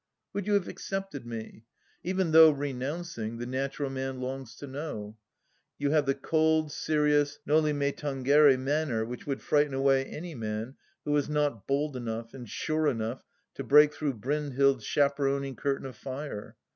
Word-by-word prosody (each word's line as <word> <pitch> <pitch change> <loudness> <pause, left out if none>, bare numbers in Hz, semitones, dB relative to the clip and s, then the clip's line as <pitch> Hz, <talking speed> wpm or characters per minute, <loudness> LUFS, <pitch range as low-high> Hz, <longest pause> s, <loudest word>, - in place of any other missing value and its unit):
"Would 200 -1 -3
you 210 - +2
have 200 -3 +1
accepted 195 -10 -5
me? 115 -1 -7 0.4
Even 185 -1 0
though 160 0 +9
renouncing, 140 -3 -3
the 120 - -4
natural 135 +2 -2
man 135 -1 -4
longs 130 -2 -5
to 145 - -8
know. 130 -7 -6 0.6
You 145 0 0
have 150 -2 +3
the 135 - +2
cold, 155 +2 +2
serious 150 -1 +1
noli 155 0 +3
me 140 -1 0
tangere 140 0 +4
manner 135 -4 0
which 125 +4 -8
would 135 -2 -3
frighten 145 -2 +2
away 135 0 +3
any 165 +4 -7
man 110 0 -4 0.3
who 150 - -1
was 145 -1 +1
not 145 -8 0
bold 140 +1 0
enough 115 -2 -5
and 125 -4 -9
sure 155 +7 0
enough 115 -2 -2 0.3
to 135 - -5
break 150 +4 +6
through 145 -4 -2
Brynhild's 140 0 +1
chaperoning 140 -1 +1
curtain 135 +1 -2
of 130 -3 -7
fire. 130 -4 -7
140 Hz, 160 wpm, -29 LUFS, 130-150 Hz, 0.6 s, though